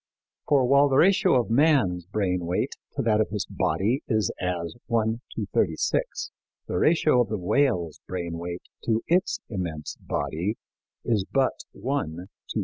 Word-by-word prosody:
For 140 -4 +4
while 140 +3 +5
the 135 - +2
ratio 190 0 +5
of 115 - -2
man's 115 - +3
brain 90 -4 -1
weight 90 - 0 0.2
to - - -2
that 110 -2 +3
of 110 - 0
his 105 -2 -2
body 100 - 0
is 110 -5 +1
as 90 -2 -2
1 115 -1 0
to 110 - -2
36, 80 -5 0 0.4
the 90 - -1
ratio 155 -5 +4
of 115 - -1
the 110 - -1
whale's 90 - +1
brain 85 -2 -4
weight 85 +1 -5 0.2
to 115 -1 +1
its 180 +3 +2
immense 85 -7 -4
body 90 +8 -2 0.5
is 110 -5 +2
but 135 -2 +2 0.2
1 140 +3 -1
to 90 +2 -8
3,000. - - -22
110 Hz, 160 wpm, -26 LUFS, 90-130 Hz, 0.5 s, while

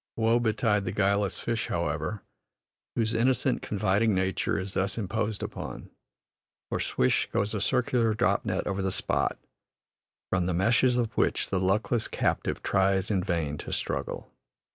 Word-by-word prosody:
Woe 115 +1 +3
betide 110 -3 +1
the 90 - -1
guileless 100 0 +1
fish, 115 -1 -2
however, 85 +4 -2 0.7
whose 110 -1 +1
innocent, 130 +2 +2
confiding 105 +1 +1
nature 95 0 0
is 95 +1 -4
thus 95 +3 0
imposed 110 0 -1
upon, - - -6 0.8
for - - -1
"swish" 65 - +1
goes 100 +2 0
a 105 - -2
circular 115 -1 +2
drop - - +2
net - - -1
over 100 0 -1
the 95 0 0
spot, - - 0 0.9
from 90 -2 +1
the 90 - 0
meshes 120 +6 +3
of 115 -2 -1
which - - +1
the 95 - +1
luckless 100 +4 +1
captive - - -1
tries 95 +1 +2
in 95 -3 +1
vain 80 -6 -1
to - - -7
struggle. - - -3
100 Hz, 150 wpm, -28 LUFS, 95-115 Hz, 0.9 s, Woe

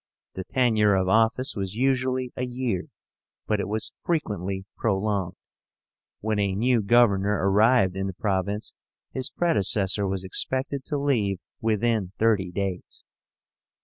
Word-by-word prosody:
The 95 - -5
tenure 110 -5 +3
of 95 -1 +1
office 115 +6 +2
was 95 -1 -4
usually 130 0 0
a 125 - -3
year, 125 -6 -2 0.6
but 105 -1 0
it - - -2
was 110 +2 -2
frequently 100 - -2
prolonged. 100 -3 -1 0.9
When 110 0 -1
a 100 -2 0
new 120 +2 +2
governor 105 -2 +3
arrived 100 -1 +4
in 95 0 -2
the 95 - -4
province, 100 +1 -2 0.4
his 130 -1 -2
predecessor 100 - +2
was 95 0 -2
expected 130 +8 -2
to 150 - -2
leave 115 -9 +1 0.2
within 110 -3 0
thirty 105 -5 +2
days. 95 0 -5
105 Hz, 130 wpm, -25 LUFS, 95-125 Hz, 0.9 s, arrived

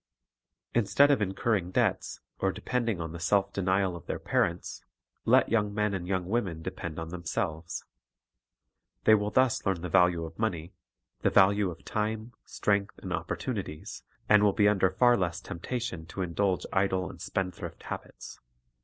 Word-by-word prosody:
Instead 140 +6 +4
of 135 - +2
incurring 95 -1 0
debts, - - 0 0.2
or 95 - +1
depend 120 +3 -2
ing 100 -6 -1
on 80 -1 -4
the 85 - -7
self 100 +3 +1
denial 95 -1 +1
of 85 - -11
their - - -2
parents, - - -1 0.4
let - - +5
young 105 -3 +2
men 105 0 0
and 90 -2 -3
young 95 -1 -1
women 95 -6 -2
depend 80 -1 -5
on. 80 0 -5
themselves. 85 -1 -3 1.2
The)' 110 - +6
will 105 -1 +3
thus 130 +1 +2
learn 95 -4 0
the 90 - -4
value 85 0 +3
of 80 +3 -11
money, 90 -6 -2 0.5
the - - +3
value 100 0 +4
of 85 - -10
time, 110 +2 -2
strength, 100 -1 0
and - - -5
opportunities, 75 - -4 0.3
and 105 -1 +6
will 105 -1 +4
be 105 +1 +4
under 95 -2 +3
far 120 +6 +4
less 90 -5 -1
temptation 90 -2 -5
to 95 +3 -4
indulge 90 +2 0
idle 95 -1 +1
and - - -10
spendthrift 95 -1 -4
habits. - - -8
95 Hz, 160 wpm, -29 LUFS, 85-105 Hz, 1.2 s, The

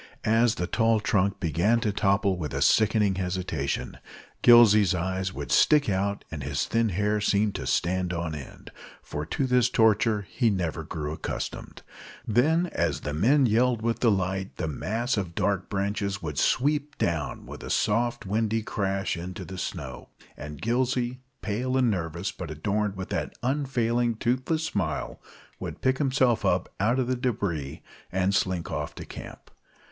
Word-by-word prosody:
As 115 +1 +3
the 90 - -2
tall 115 +3 +2
trunk 100 -2 +1
began 95 +7 +2
to 105 - +1
topple 100 0 +2
with 80 -5 -5
a - - -1
sickening 110 -2 +3
hesitation, 90 -6 -3 0.4
Gillsey's 105 -6 +7
eyes 95 +2 -2
would - - -6
stick 150 -2 +5
out 100 +1 -1
and 80 -3 -5
his - - -1
thin 115 -1 +1
hair 105 +3 0
seem 105 0 +2
to - - -5
stand 90 0 0
on 85 -2 -3
end, 75 -3 -9 0.3
for 75 +1 -5
to 135 - -1
this 125 -2 +3
torture 110 -2 +3
he 120 -3 +1
never 85 -5 -1
grew 75 -1 -4
accustomed. - - -6 0.4
Then, 155 +10 +3
as 80 -4 0
the 75 - -4
men 130 - +4
yelled 120 0 +2
with 115 0 0
delight, 95 -4 0
the 80 - -2
mass 110 - -2
of 90 -4 -3
dark 100 -2 0
branches 100 0 -1
would - - -4
sweep 150 +3 +1
down 80 -4 -2
with - - -9
a - - -7
soft, 115 +2 +1
windy 110 +2 0
crash 95 -4 -1
into 90 +2 -6
the 95 +2 -7
snow, 65 -7 -6 0.3
and 75 -1 -8
Gillsey, 125 +1 0 0.2
pale 125 +5 -1
and 125 -3 +3
nervous, 85 0 -3
but 90 -4 -7
adorned 100 +6 -1
with 95 -1 -6
that - - -2
unfailing 120 -3 0
toothless 130 +8 0
smile, 105 -11 -3 0.4
would - - -6
pick 130 0 +1
himself 130 -4 +2
out 115 +6 +1
of 130 - +1
the 130 +1 0
débris 100 - -2 0.3
and 95 +1 +1
slink 90 -3 0
off - - -4
to - - -8
camp. - - -10
105 Hz, 160 wpm, -27 LUFS, 90-120 Hz, 0.4 s, Gillsey's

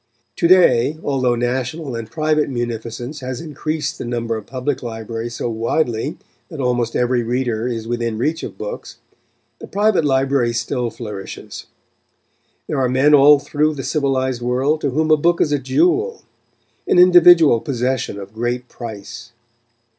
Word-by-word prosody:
To 170 - +2
day, 155 -6 +4
although 130 -3 +1
national 125 +4 -3
and 115 -1 -6
private 155 +4 0
munificence 120 +2 -5
has 130 -2 -5
increased 155 -1 -4
the - - -4
number 120 -1 -2
of 110 -2 -7
public 130 +1 -3
libraries 115 0 -5
so - - -3
widely 115 +3 -1 0.3
that 155 - -9
almost 120 -3 -1
every 125 0 +1
reader 120 -1 -1
is 115 -2 -4
within 115 -2 -2
reach 155 +8 -1
of - - -7
books, - - -7 0.6
the - - -9
private 205 -4 +2
library 135 -3 +1
still 120 +1 -2
flourishes. 105 -5 -8 1.0
There 135 - -2
are 125 - +1
men 135 +4 +3
all 145 +1 +7
through 150 +2 -1
the 135 - -5
civilised 130 -4 -1
world 130 +6 0
to 140 - 0
whom 155 +4 0
a 155 - +6
book 170 +3 +2
is 150 - +2
a 145 - +1
jewel 360 - +1 0.6
an - - +2
individual 175 -7 +7
possession 125 -3 -2
of 100 +1 -10
great 120 +2 -3
price. 120 +1 -9
130 Hz, 155 wpm, -19 LUFS, 120-150 Hz, 1.0 s, all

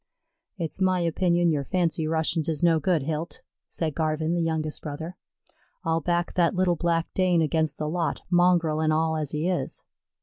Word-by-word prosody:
"It's 170 +2 -4
my 185 -1 +3
opinion 170 0 +2
yer 145 -3 0
fancy 165 -1 0
Russians 160 0 0
is 155 -1 -2
no 165 -2 +4
good, 160 -1 +1
Hilt," 160 +3 -4 0.3
said 160 -3 -2
Garvin, 155 +1 0
the 175 - 0
younger 160 -2 -1
brother. 160 +4 -6 0.7
"I'll 165 -1 0
back 175 0 0
that 175 -1 +2
little 180 -1 +2
black 165 0 -1
Dane 180 -3 +3
against 155 -1 0
the 150 - -2
lot, 165 +1 -2
mongrel 175 -3 +3
an' 155 0 +2
all 160 +1 +1
as 155 -3 -2
he 150 +3 -2
is." 185 -1 -2
165 Hz, 175 wpm, -26 LUFS, 155-175 Hz, 0.7 s, no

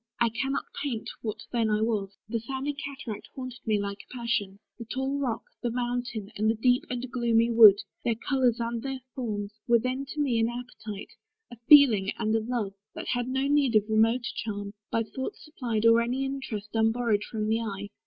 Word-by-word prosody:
I 235 -1 +4
cannot 270 +4 -2 0.2
paint 255 -6 -3
What 215 -1 -5
then 230 -3 +1
I 210 0 +2
was. 205 -3 -1
The 230 +1 -1
sounding 270 +5 -3
cataract 275 -7 -6
Haunted 255 -2 -6
me 215 -2 +2
like 200 0 -4
a - - -22
passion: 235 -5 -2 0.2
the 230 - -6
tall 265 +4 -2
rock, 240 -5 -1 0.2
The 240 - 0
mountain, 240 -3 -3
and 215 +1 +1
the 225 - +2
deep 245 +3 +2
and 250 0 -3
gloomy 235 -2 +2
wood, 220 -4 +9 0.3
Their 235 - +1
colours 250 0 +1
and 235 0 -2
their 270 0 -4
forms, 210 -5 -3
were 235 - +6
then 255 +4 -2
to 300 - -6
me 260 -6 +2
An 225 0 +2
appetite: 230 -4 -7 0.4
a 240 - -10
feeling 240 -10 +8
and 220 -1 0
a - - +3
love, 220 -4 -2 0.2
That - - -5
had 245 0 0
no 265 +1 0
need 280 -4 +3
of 215 - +6
a 220 +1 -4
remoter 225 +3 +3
charm, 205 -2 -4 0.2
By 230 - +1
thought 265 - -5
supplied, 235 -8 -3
or 230 0 +7
any 250 +3 -1
interest 265 -7 -4
Unborrowed 225 -1 +2
from 215 -1 -3
the 220 +1 +2
eye. 205 -2 -5
235 Hz, 200 wpm, -28 LUFS, 215-255 Hz, 0.4 s, wood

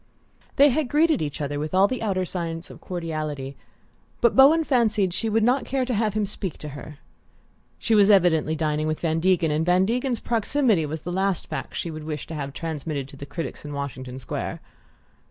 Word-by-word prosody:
They 285 +1 +7
had 280 +1 0
greeted 310 0 +3
each 150 -1 -3
other 145 0 -2
with 155 +4 -3
all 195 +1 +6
the 255 +1 -3
outer 190 -4 0
signs 170 -2 -5
of - - -13
cordiality, 155 -6 -4 0.6
but 235 - +3
Bowen 295 +5 +7
fancied 220 - +2
she 225 +4 -1
would 220 +1 +2
not 250 +4 +3
care 265 -1 -1
to 250 - -2
have 215 -1 0
him 215 -1 +1
speak 195 -4 -5
to 150 - -7
her. 145 +1 -9 0.8
She 230 - 0
was 205 -1 +6
evidently 170 -6 +4
dining 155 0 -1
with 155 0 -1
Van 165 -1 0
Degen, 170 -2 +2
and 155 +2 +1
Van 180 +2 +3
Degen's 245 +2 -1
proximity 230 - +1
was 155 +1 -5
the 175 - -4
last 190 -1 0
fact - - -6
she 170 - -3
would 155 -1 -7
wish 150 -2 -4
to 165 - -8
have 140 -3 -4
transmitted 150 -3 -4
to - - -12
the 140 +1 -9
critics 165 +4 -6
in 145 -1 -7
Washington 130 -2 -5
Square. 130 - -4
175 Hz, 205 wpm, -24 LUFS, 150-220 Hz, 0.8 s, They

